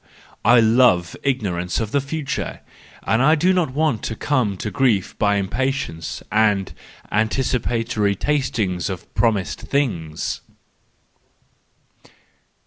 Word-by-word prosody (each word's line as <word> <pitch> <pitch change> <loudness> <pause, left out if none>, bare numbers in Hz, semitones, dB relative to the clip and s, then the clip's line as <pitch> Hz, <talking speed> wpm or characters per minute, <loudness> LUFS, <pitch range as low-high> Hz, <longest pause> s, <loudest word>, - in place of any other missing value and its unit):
I 120 +3 +6
love 110 -7 +4
ignorance 95 -10 -1
of 110 -2 -3
the 140 - +2
future, 140 0 -4 0.4
and 135 +9 +3
do 185 +4 +4
not 175 -5 +1
want 145 -5 0
to 115 - -3
come 120 -7 0
to 105 - -4
grief 120 -9 +1
by 100 -1 +3
impatience 100 - -2
and 105 -3 +2 0.4
antici¬ 110 +4 +1
patory 115 -4 0
tasting 115 -11 -1
of 95 -3 -5
promised 105 -6 0
things." 90 - -2
115 Hz, 110 wpm, -21 LUFS, 100-135 Hz, 0.4 s, I